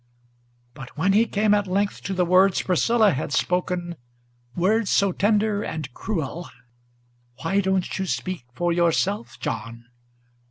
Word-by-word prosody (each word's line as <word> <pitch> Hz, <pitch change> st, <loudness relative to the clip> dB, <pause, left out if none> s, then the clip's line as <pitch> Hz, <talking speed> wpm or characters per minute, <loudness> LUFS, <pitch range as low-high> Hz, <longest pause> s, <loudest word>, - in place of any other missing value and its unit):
But 125 Hz, +3 st, -11 dB
when 190 Hz, +5 st, +2 dB
he 225 Hz, +3 st, +4 dB
came 210 Hz, 0 st, +2 dB
at 205 Hz, -1 st, +1 dB
length 200 Hz, +2 st, -1 dB
to 195 Hz, -, -2 dB
the 180 Hz, -1 st, +2 dB
words 185 Hz, +2 st, +4 dB
Priscilla 215 Hz, +4 st, +3 dB
had 130 Hz, -, -3 dB
spoken, 175 Hz, +1 st, -1 dB, 0.6 s
Words 205 Hz, +4 st, +1 dB
so 200 Hz, -1 st, +3 dB
tender 205 Hz, +2 st, +1 dB
and 155 Hz, -9 st, -5 dB
cruel: 170 Hz, -, -4 dB, 0.9 s
"Why 195 Hz, +5 st, +1 dB
don't 190 Hz, -1 st, -1 dB
you 190 Hz, -, -2 dB
speak 185 Hz, -7 st, -3 dB
for 175 Hz, -1 st, 0 dB
yourself, 175 Hz, +5 st, 0 dB
John?" 115 Hz, -3 st, -5 dB
185 Hz, 135 wpm, -23 LUFS, 170-205 Hz, 0.9 s, he